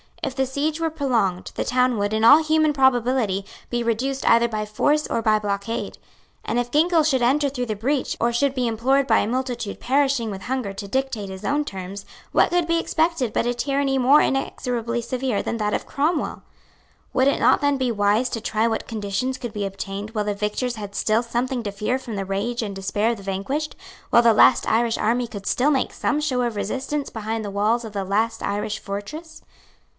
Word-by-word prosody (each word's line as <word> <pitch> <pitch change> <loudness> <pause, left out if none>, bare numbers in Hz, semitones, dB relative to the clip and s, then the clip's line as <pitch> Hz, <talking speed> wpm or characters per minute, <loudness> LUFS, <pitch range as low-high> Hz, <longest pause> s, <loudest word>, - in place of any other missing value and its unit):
If 270 -3 -2
the 265 0 +1
siege 295 +4 -2
were 325 -1 0
prolonged, 230 - 0
the - - -1
town 250 -1 +2
would, 205 +1 -1
in 220 0 0
all 290 +7 +8
human 310 -1 +2
probability, 245 -6 +2 0.3
be 240 -1 -1
reduced 260 +4 -1
either 235 +1 +5
by 215 -2 -3
force 290 +8 +1
or 230 - -1
by 215 -1 +3
blockade. 205 +2 -3 0.5
And, - - -1
if 245 0 -1
Ginkell 325 +3 +3
should 270 -4 +2
enter 280 +4 +3
through 250 -2 -3
the 215 - -2
breach, 260 +7 -1
or 235 - +2
should 275 +3 +1
be 250 -2 0
implored 260 +5 +1
by 225 - +4
a - - 0
multitude 245 -3 -3
perishing 270 -4 +1
with 190 -1 -7
hunger 250 -6 -3
to 200 +1 -7
dictate 250 -3 -2
his 190 0 -8
own 295 +1 0
terms, 195 -2 -7 0.3
what - - +4
could 350 -1 +1
be 335 0 +2
expected 320 -8 0
but 235 - 0
a 245 - +1
tyranny 275 +2 0
more 265 +4 +5
inexorably 240 -3 -1
severe 255 -2 -2
than 230 - -2
that 210 -1 -1
of - - -1
Cromwell? 305 +3 -1 0.7
Would 260 +1 +3
it 280 - +2
not - - +4
then 285 -1 +2
be 260 -2 0
wise 210 +3 +2
to 225 - -4
try 220 +1 0
what 225 -1 -2
conditions 225 +4 -2
could 240 -3 -6
be 205 -1 -2
obtained 195 +1 -5
while 210 -2 -2
the 205 - 0
victors 210 +4 -2
had 205 -2 -7
still 220 +1 +2
something 245 +2 -2
to 205 - -3
fear 210 +6 -1
from 235 -4 -7
the 195 -1 -3
rage 205 +5 -2
and 200 -2 -5
despair 205 +4 0
of 235 - -3
the 200 - -11
vanquished; 200 +11 -3 0.4
while 235 - +6
the 230 -1 +6
last - - +5
Irish 230 +1 +2
army 240 +2 +1
could 200 -4 -8
still 280 +4 +2
make 265 -3 0
some 295 - 0
show 275 -5 0
of 240 -2 -1
resistance 270 +7 -3
behind 220 0 -3
the 205 - -5
walls 215 +4 +1
of 215 - -8
the 200 -1 -2
last 225 +4 0
Irish 210 +1 -2
fortress? 305 +12 -7
235 Hz, 210 wpm, -23 LUFS, 210-270 Hz, 0.7 s, all